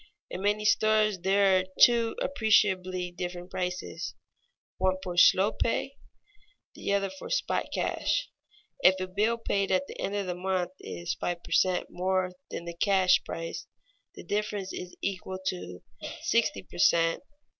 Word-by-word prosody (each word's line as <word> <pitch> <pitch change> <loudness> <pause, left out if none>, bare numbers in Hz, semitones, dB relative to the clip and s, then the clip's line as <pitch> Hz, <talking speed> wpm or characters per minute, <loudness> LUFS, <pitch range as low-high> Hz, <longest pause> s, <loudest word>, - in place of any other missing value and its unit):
In 185 - -5
many 210 +1 +1
stores 215 -2 +3
there 195 +1 +4
are - - -1 0.2
two 235 -1 +5
appreciably 185 -7 +2
different 175 0 -6
prices, 180 -2 -4 0.6
one 185 0 +2
for 180 -2 -5
"slow 190 +4 +6
pay," 270 +4 -2 0.8
the - - -4
other 195 -1 +1
for 190 - -9
"spot - - 0
cash." - - -1 0.5
If 190 -6 +5
a 185 - -1
bill 210 +5 +1
paid 200 -4 -1
at 185 0 +2
the - - -11
end 200 - -2
of 200 -1 -1
the 180 - -2
month 180 0 -1
is 170 -1 -4
five 175 +2 -4
per - - -12
cent. 185 -1 +2
more 185 0 0 0.2
than 170 - -6
the 170 - -5
cash 190 -2 +4
price, 165 0 -6 0.5
the - - -10
difference 205 -2 -2
is 180 0 -7
equal 190 -1 -3
to 90 - -7 0.4
sixty - - +1
per - - -12
cent. 165 0 +3
185 Hz, 155 wpm, -28 LUFS, 180-205 Hz, 0.8 s, slow